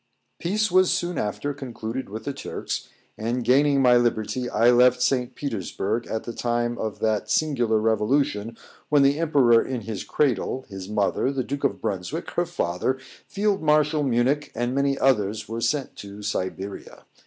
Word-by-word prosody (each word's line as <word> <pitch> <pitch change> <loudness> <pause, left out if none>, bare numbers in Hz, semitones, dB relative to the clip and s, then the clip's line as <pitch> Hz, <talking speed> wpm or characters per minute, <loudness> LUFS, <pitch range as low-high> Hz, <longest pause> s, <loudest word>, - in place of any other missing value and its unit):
Peace 210 +3 0
was 185 0 +4
soon 175 0 -1
after 145 +7 -2
concluded 130 -3 -6
with 110 +2 -6
the 140 - -3
Turks, 140 - -5 0.3
and 120 +3 -1
gaining 140 +3 +4
my 125 -1 +6
liberty, 120 +1 0
I 115 +2 +4
left 125 +1 +5
St. 125 -1 0
Petersburg 110 - -3
at 110 - -3
the 120 - -6
time 120 0 -1
of 110 -2 -3
that 110 -1 0
singular 120 -8 +2
revolution, 110 0 0 0.3
when 145 -2 +5
the 140 +2 +3
emperor 135 -8 +4
in 130 -3 -4
his 105 -2 -5
cradle, 130 -1 0
his 95 -1 -8
mother, 105 +5 +1
the 135 -2 -2
Duke 140 +3 -3
of 140 - 0
Brunswick, 110 - -3
her 175 0 0
father, 130 - -1 0.3
Field 205 -1 0
Marshal 150 0 +3
Munich, 135 +2 +1
and 120 +2 -1
many 140 0 +1
others 105 -6 +1
were 115 +1 -4
sent 145 +2 -1
to 100 +1 -9
Siberia. 95 -1 -5
125 Hz, 165 wpm, -24 LUFS, 110-140 Hz, 0.3 s, my